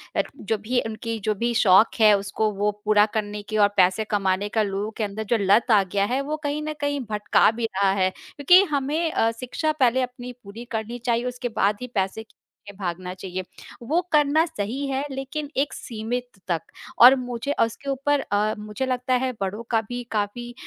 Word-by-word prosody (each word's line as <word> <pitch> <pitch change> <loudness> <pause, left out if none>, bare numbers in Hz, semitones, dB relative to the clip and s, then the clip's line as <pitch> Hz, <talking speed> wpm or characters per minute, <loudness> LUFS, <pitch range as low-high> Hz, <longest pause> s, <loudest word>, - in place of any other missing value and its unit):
अ, - - +4 0.2
जो 220 -1 -1
भी 240 +5 -1
उनकी 225 +1 -4
जो 215 - +2
भी 235 +3 -1
शौक 195 +1 +6
है, 215 -1 +7
उसको 200 +2 -1
वो 205 +1 0
पूरा 210 0 +5
करने 210 -1 -3
की 215 - -1
और 205 -1 +6
पैसे 185 +3 +4
कमाने 195 0 0
का 220 - +1
लोगों 205 +2 -3
के 220 - -1
अंदर 210 +1 -4
जो 235 - +4
लत 205 +5 +3
आ 205 -3 +6
गया 200 +2 0
है, 270 - +1
वो 300 +2 -3
कहीं 290 +1 -2
न 310 0 -3
कहीं 285 0 0
भटका 210 0 +3
भी 230 0 -3
रहा 195 0 +3
है। 190 -1 +2
क्योंकि 355 - +4
हमें 300 +4 0
अ, 225 0 +2
शिक्षा 260 +5 -1
पहले 255 0 +3
अपनी 250 0 -5
पूरी 215 +4 -9
करनी 225 +1 -4
चाहिए, 235 0 +1
उसके 250 0 -3
बाद 205 +1 +3
ही 250 - -4
पैसे 195 +3 -1
के 215 - -29 0.4
पीछे 200 - -9
भागना 180 -1 -4
चाहिए। 185 0 -6 0.4
वो 330 +5 +2
करना 300 +1 +4
सही 270 -3 -4
है, 270 0 -1
लेकिन 280 +2 -5
एक 280 +2 0
सीमित 240 +1 -4 0.2
तक, 170 -3 0 0.4
और 250 +3 +10
मुझे 250 +1 -3
उसके 230 +5 -4
ऊपर 280 +2 +1
अ, 210 0 0
मुझे 210 +4 -4
लगता 255 0 -1
है, 255 +1 +1
बड़ों 200 +4 -3
का 225 -1 +3
भी 245 0 -4
काफ़ी 220 +3 -3
225 Hz, 205 wpm, -24 LUFS, 205-260 Hz, 0.4 s, और